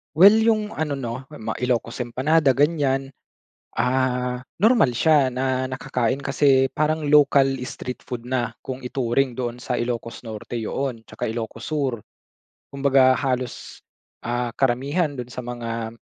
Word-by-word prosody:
Well, 200 +6 +8
yung 220 -2 +2
ano 150 -2 -2
'no, 130 -1 -5
mga 110 -8 -6
Ilocos 120 -1 -1
empanada 135 +4 +2
ganyan, 140 -2 +1 0.7
ah, 125 -1 0 0.2
normal 215 - +4
siya 140 +2 +3
na 130 0 -1
nakakain 130 -1 -1
kasi 135 -1 +3
parang 155 0 0
ocal 140 -2 +6 0.2
street 125 -1 -6
food 120 -1 -7
na 125 -2 -1 0.2
kung 130 0 -5
ituring 125 0 -1
doon 120 -1 -4
sa 125 - -2
Ilocos 120 0 -4
Norte 110 +2 -6
yoon 115 0 -3
'tsaka 110 0 -4
Ilocos 115 0 -5
Sur. 135 -7 -1 0.7
Kumbaga 135 -1 +4
halos, 130 -2 -3 0.4
ah, 120 0 -2
karamihan 140 +5 +1
do'n 125 -3 -6
sa 125 0 -7
mga 115 -2 -4
130 Hz, 135 wpm, -23 LUFS, 120-140 Hz, 0.7 s, Well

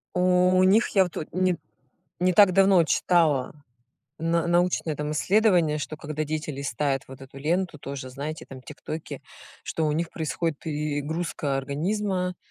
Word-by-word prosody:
У 180 0 +4
них, 200 +5 +4
я 195 - +4
вот 170 -3 -5
не 185 0 +1 0.6
не 185 +1 +3
так 200 0 +6
давно 190 -2 +5
читала 155 -4 +2 0.7
научное 170 0 +1
там 150 0 -3
исследование, 180 -3 +3
что 155 +1 -5
когда 155 0 -4
дети 155 +1 -3
листают 140 -1 -2
вот 135 0 -12
эту 135 +1 -12
ленту, 170 +3 -1
тоже, 135 -2 -6
знаете, 145 +4 -6
там 130 -1 -11
тиктоки, 155 +2 -7 0.4
что 160 - -2
у - - +1
них 165 +2 -1
происходит 160 -1 -2
перегрузка 150 0 -3
организма, 180 +6 -2
160 Hz, 140 wpm, -25 LUFS, 145-180 Hz, 0.7 s, так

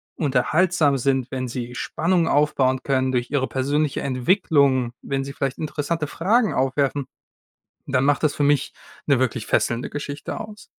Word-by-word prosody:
unterhaltsam 150 +2 +2
sind, 130 0 0
wenn 130 -1 -3
sie 120 0 -6
Spannung 170 +5 0
aufbauen 135 -4 +2
können 130 -1 +1
durch 125 -1 -1
ihre 135 -3 +1
persönliche 145 +2 -1
Entwicklung, 135 - +2
wenn 135 -1 -2
sie 140 0 -7
vielleicht 135 -2 -2
interessante 155 +1 -2
Fragen 215 - +1
aufwerfen, 135 +1 0 0.8
dann 130 -1 +1
macht 145 0 +2
das 155 -2 +2
für 145 - 0
mich 145 -1 +2 0.3
'ne 140 -3 +3
wirklich 125 -3 -1
fesselnde 120 +1 0
Geschichte 145 0 -5
aus. 215 -1 -9
140 Hz, 150 wpm, -23 LUFS, 130-150 Hz, 0.8 s, ne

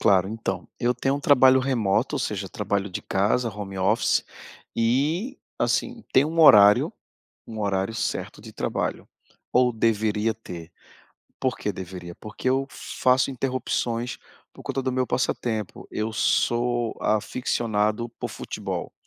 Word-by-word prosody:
Claro, 95 -1 +4
então, 95 -5 -4
eu 125 +1 +1
tenho 135 +1 0
um - - -5
trabalho 130 -2 +6
remoto 120 0 +1
ou - - -1
seja 100 -5 -3
trabalho 100 -1 -2
de 90 - -5
casa, 105 +5 +1
home 100 -1 -6
office 95 - +2 0.5
e 150 - 0 0.2
assim, 245 -2 0
tem 130 - +5
um 165 +2 -4
horário, 105 -9 +7 0.6
um 110 -1 -7
horário 100 0 0
certo - - -3
de - - -11
trabalho. - - -3 0.5
Ou 125 0 +4
deveria 110 -1 +1
ter. 85 -6 -10 0.7
Por 130 -1 0
que 105 - -2
deveria? 90 -2 -8
Porque 110 +4 -5
eu 135 +1 +1
faço 130 +1 +1
interrupções 125 -2 -2 0.3
por - - -13
conta 135 - -2
do 130 -1 -1
meu 130 -1 0
passatempo. 115 -4 -2
Eu 110 +1 -2
sou 120 +1 +1
aficcionado 110 0 0
por - - -3
futebol. - - -5
115 Hz, 140 wpm, -25 LUFS, 105-130 Hz, 0.7 s, horário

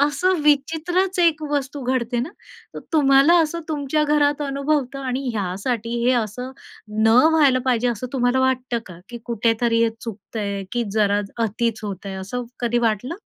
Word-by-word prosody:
असं 335 +6 +2
विचित्रच 325 +6 +1
एक 325 -3 +3
वस्तू 285 -1 -2
घडते 245 -1 -1
ना, 255 - -3 0.5
तर - - -5
तुम्हाला 280 +1 +5
असं 330 +2 -3
तुमच्या 300 0 0
घरात 295 -1 +2
अनुभवता 275 -1 -1
आणि 260 +2 -2
ह्यासाठी 210 +4 -3
हे 255 - +4
असं 240 +2 -2 0.5
न - - +5 0.2
व्हायला 285 -5 +4
पाहिजे, 250 -2 +1
असं 240 +1 -3
तुम्हाला 245 0 +1
वाटतं 255 -2 0
का, 175 -2 -11
की 240 -1 -7
कुठेतरी 230 0 +1
हे 230 - +2
चुकतंय 205 -2 -5
की 240 -1 0
जरा 205 -1 +2 0.2
अतिच 230 +1 -1
होतंय 195 -1 -6
असं 245 +6 -4 0.2
कधी 240 0 +1
वाटलं? 235 +5 -1
250 Hz, 155 wpm, -22 LUFS, 230-290 Hz, 0.5 s, तुम्हाला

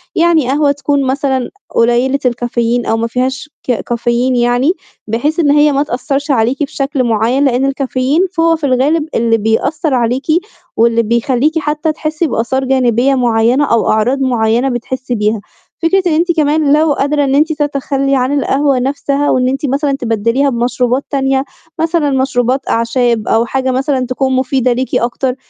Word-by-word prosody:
يعني 330 -6 +2
قهوة 285 +1 +2
تكون 285 0 -1
مثلًا 265 -2 -1 0.3
قليّلة 240 +4 +2
الكافيين 240 -1 -1
أو 225 - 0
ما 230 +1 -1
فيهاش 260 +4 -3
ك 255 - -1
كافيين 240 +2 -1
يعني، 245 +7 +2 0.3
بحيث 290 +10 -1
إن 290 -3 +3
هي 295 0 +4
ما 280 +1 +1
تأثّرش 275 +2 -2
عليكِ 250 +4 +1
بشكل 275 -1 -2
معيّن، 235 +5 +1
لإن 260 +1 +1
الكافيين 275 +3 0 0.2
هو 330 0 +3
في 315 - -11
الغالب 285 +4 +1
اللي 230 -1 +2
بيأثّر 275 - -1
عليكِ 245 +2 0 0.5
واللي 230 0 +3
بيخلّيكِ 250 +7 0
حتّى 305 +1 -1
تحسّي 310 +1 -2
بآثار 260 +2 -1
جانبية 255 0 +2
معيّنة 240 +3 +2
أو 230 -3 +1
أعراض 240 +6 +1
معيّنة 240 0 +1
بتحسّي 250 +1 -4
بيها، 210 0 -1 0.4
فكرة 380 +3 +2
إن 320 - +1
أنتِ 340 +3 +2
كمان 300 -2 +2
لو 305 -1 +3
قادرة 285 +1 0
إن 270 0 +1
أنتِ 315 +2 +2
تتخلّي 275 -2 -1
عن 265 +3 +1
القهوة 275 -1 +1
نفْسها 280 +2 -1
وإن 255 0 +2
أنتِ 270 +3 -2
مثلًا 280 +2 0
تبدّليها 235 +2 0
بمشروبات 250 +2 0
تانية، 270 -1 0 0.4
مثلًا 325 -2 +1
مشروبات 260 -1 0
أعشاب 230 -1 0
أو 230 +1 +2
حاجة 260 +1 -1
مثلًا 260 0 0
تكون 260 +1 -1
مفيدة 255 -1 +1
ليكِ 255 +1 -3
أكتر، 250 +2 -1
265 Hz, 160 wpm, -14 LUFS, 240-285 Hz, 0.5 s, هي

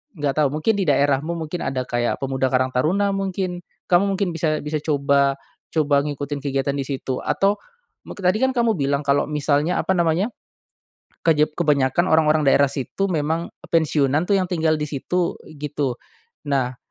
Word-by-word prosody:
nggak 145 -3 -2
tahu, 150 -2 +4
mungkin 155 +9 +1
di 195 - 0
daerahmu, 145 +1 +2
mungkin 165 +1 -4
ada 130 -1 -1
kayak 120 -1 -1
pemuda 135 -1 -1
karang 130 0 +2
taruna 185 +11 +1
mungkin, 190 -2 -3 0.3
kamu 175 +2 +4
mungkin 195 -1 0
bisa 155 -1 0
bisa 150 +1 -2
coba 140 -2 +2 0.4
coba 145 -3 +3
ngikutin 145 0 -4
kegiatan 140 0 0
di 135 - -2
situ. 135 -1 -3
Atau, 200 +1 +2 0.5
muk - - -9
tadi 185 +2 +2
kan 260 +3 +1
kamu 235 -4 +1
bilang 140 -1 0
kalau 140 -1 +2
misalnya, 150 +3 0
apa 190 - 0
namanya, 170 +5 +1 1.0
kejep 150 -2 +2
kebanyakan 150 +1 +2
orang-orang 155 -1 +4
daerah 140 0 +4
situ, 140 +8 -2
memang, 160 0 -1
eee, - - -19
pensiunan 155 -1 +2
tuh 200 - +4
yang 190 - +1
tinggal 160 -2 +2
di 150 - -2
situ, 160 +5 -2 0.2
gitu. 145 -3 -2 0.5
Nah, 130 -3 0
150 Hz, 165 wpm, -22 LUFS, 140-175 Hz, 1.0 s, tahu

